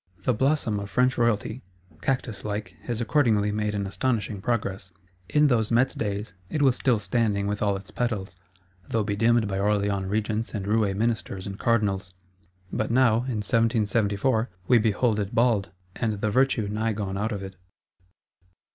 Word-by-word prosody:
The 125 - +2
Blossom 130 -4 +1
of 100 0 -6
French 125 +5 +2
Royalty, 115 0 0 0.4
cactus 120 -6 -2
like, 105 -4 -4
has 120 -1 -2
accordingly 110 -5 +2
made 105 0 -1
an 100 -1 -1
astonishing 105 -1 -1
progress. 100 -4 -2 0.4
In 150 0 +4
those 120 -6 +2
Metz 120 +3 +3
days, 105 0 -3 0.2
it 150 - 0
was 130 -3 +4
still 125 -4 +2
standing 105 0 0
with 105 +1 -2
all 100 -2 +1
its 95 0 -12
petals, 105 -5 -2 0.5
though 110 -1 +1
bedimmed 110 +2 +2
by 95 -1 -2
Orleans 100 -1 +1
Regents 110 +2 -1
and 100 -2 -3
Roué 105 -2 +1
Ministers 105 -3 -2
and 100 0 -6
Cardinals; 100 -5 0 0.6
but 110 - -1
now, 120 -2 +4
in 115 -4 -2
1774, 110 +1 +1 0.2
we 125 -2 +6
behold 110 0 +1
it 100 0 -3
bald, 115 -4 +2 0.3
and 115 -3 -1
the 105 +1 -1
virtue 130 -3 +2
nigh 110 +2 -1
gone 100 -2 -3
out 105 +4 -1
of 100 -3 -4
it. 95 0 -8
110 Hz, 165 wpm, -26 LUFS, 100-120 Hz, 0.6 s, we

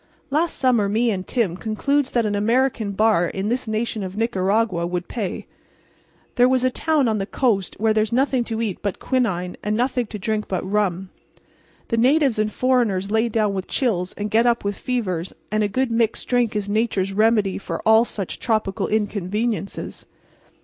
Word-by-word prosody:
"Last 320 +4 +1
summer 240 -6 +2
me 225 +3 +2
and 185 -2 -4
Tim 220 -9 0
concludes 255 +8 0
that 235 -2 +1
an 210 - 0
American 225 +1 +1
bar 210 -4 +3
in 195 +4 -3
this 245 0 -2
nation 220 0 -2
of 190 +1 -6
Nicaragua 195 -4 +1
would 180 0 -3
pay. 210 -7 -4 0.9
There 245 +1 +6
was 255 -1 +2
a 255 - +2
town 305 -1 +1
on 215 -2 0
the 195 - -3
coast 210 -9 0
where 220 0 +3
there's 215 0 +1
nothing 260 0 +2
to 225 0 -2
eat 205 -5 -3
but 200 -2 -2
quinine 190 -9 -1
and 210 +1 -1
nothing 250 -1 0
to 215 - -6
drink 215 +1 -2
but 185 -1 -3
rum. 195 -2 -1 0.8
The 230 - 0
natives 265 0 +3
and 215 0 +1
foreigners 220 -6 +1
lay 220 +2 +2
down 215 -2 +1
with 190 -1 -4
chills 185 -9 -1
and 210 0 -4
get 230 +2 +4
up 235 -1 +2
with 200 0 -1
fevers; 190 -10 -3 0.2
and 215 0 +1
a 210 - +2
good 255 +4 -1
mixed 230 -1 0
drink 245 -3 +1
is 205 -1 -1
nature's 205 -2 0
remedy 215 -2 +2
for - - -5
all 220 +1 +7
such 200 -5 -5
tropical 215 -4 0
inconveniences. 210 0 -2
215 Hz, 185 wpm, -22 LUFS, 200-240 Hz, 0.9 s, all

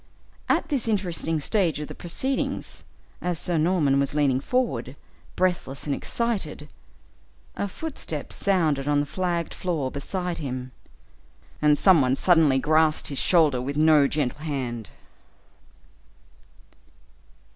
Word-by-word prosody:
At - - +1
this 270 -7 0
interesting 175 -6 -1
stage 170 0 +1
of 150 - -5
the - - -8
proceedings, 260 +10 -3 0.4
as 180 -1 -2
Sir 170 0 -1
Norman 155 -5 +2
was 140 +1 -1
leaning 140 -3 +2
forward, 235 - -2 0.4
breathless 175 -7 -1
and 145 - -1
excited, 190 -9 -3 0.9
a 200 - -2
footstep 195 - -5
sounded 160 -8 +1
on 145 0 +3
the 145 - 0
flagged 170 +1 -2
floor 155 -8 -2
beside 180 +4 -3
him, 130 -3 -5 0.9
and 150 -1 +4
some 185 -3 +5
one 130 0 +2
suddenly 160 -5 +4
grasped 155 +2 +2
his 140 - -1
shoulder 155 -8 +3
with 140 +3 -4
no 155 -2 +5
gentle 145 -1 -2
hand. 130 -8 -4
155 Hz, 125 wpm, -25 LUFS, 140-180 Hz, 0.9 s, some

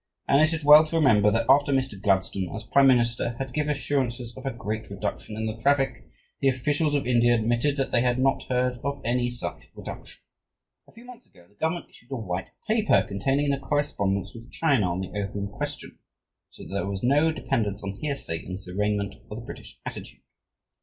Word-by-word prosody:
And 140 - +5
it 155 +1 +4
is 160 -2 -3
well 150 +1 +10
to 155 - -5
remember 115 -10 +5
that 115 +2 +1
after 140 +2 +5
Mr. 130 -7 -1
Gladstone, 95 -2 +1
as 110 - -5
prime 135 +5 +4
minister, 120 -2 +2
had 135 -1 -5
given 150 +1 -1
assurances 130 -5 -1
of 135 - -7
a - - 0
"great 110 -2 -5
reduction" 100 +2 -5
in 110 - -2
the 110 0 -3
traffic, 135 +3 +1 0.3
the 135 - +2
officials 145 +4 +1
of 140 - 0
India 120 -1 +4
admitted 120 +5 +1
that 135 - -1
they 120 - +3
had 125 0 +1
not 135 +1 +2
heard 125 0 0
of 140 0 -2
any 120 +1 +1
such 120 0 -7
reduction. - - -9 0.7
A - - -19
few 230 +2 -15
months 245 -1 -13
ago, 90 - -21
the 100 - -28
Government 160 +9 -2
issued 115 - -17
a - - -1
"White 95 -6 -4 0.2
Paper" 220 -1 +3
containing 135 +9 0
the 140 - 0
correspondence 135 -10 -1
with 115 +1 -12
China 135 - +2
on 90 +2 -2
the 95 - -5
opium 100 0 -3
question, 100 - -6 0.5
so - - -13
that - - -9
there 100 0 -1
is 95 -1 -5
no 145 +6 +4
dependence 110 -9 -2
on 100 - -3
hearsay 140 - -3
in 95 - -7
this 95 0 -7
arraignment 100 +2 -1
of 105 - -6
the 120 - -10
British - - -11
attitude. - - -8
120 Hz, 205 wpm, -26 LUFS, 105-140 Hz, 0.7 s, well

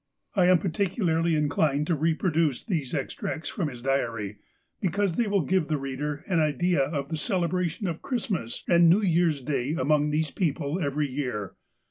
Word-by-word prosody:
I 185 -3 +4
am 180 0 +6
particularly 170 -2 0
inclined 150 -1 +1
to 170 - 0
reproduce 160 -2 +1
these 160 - -2
extracts 150 +3 -3
from 180 -8 -2
his 125 -4 -8
diary, 115 -7 -1 0.4
because 195 -1 0
they 235 - +1
will 200 -1 +2
give 180 0 +1
the 155 - 0
reader 145 +2 -4
an 180 -4 +2
idea 155 +3 +2
of 140 0 -2
the 160 - -2
celebration 180 -1 -1
of 170 -3 -3
Christmas 210 - -3
and 170 -1 +6
New 195 +6 +4
Year's 170 -5 +2
Day 135 +1 -1
among 150 +1 +2
these 150 0 0
people 155 -1 -1
every 145 -2 0
year. 125 -8 -4
160 Hz, 165 wpm, -27 LUFS, 140-180 Hz, 0.4 s, am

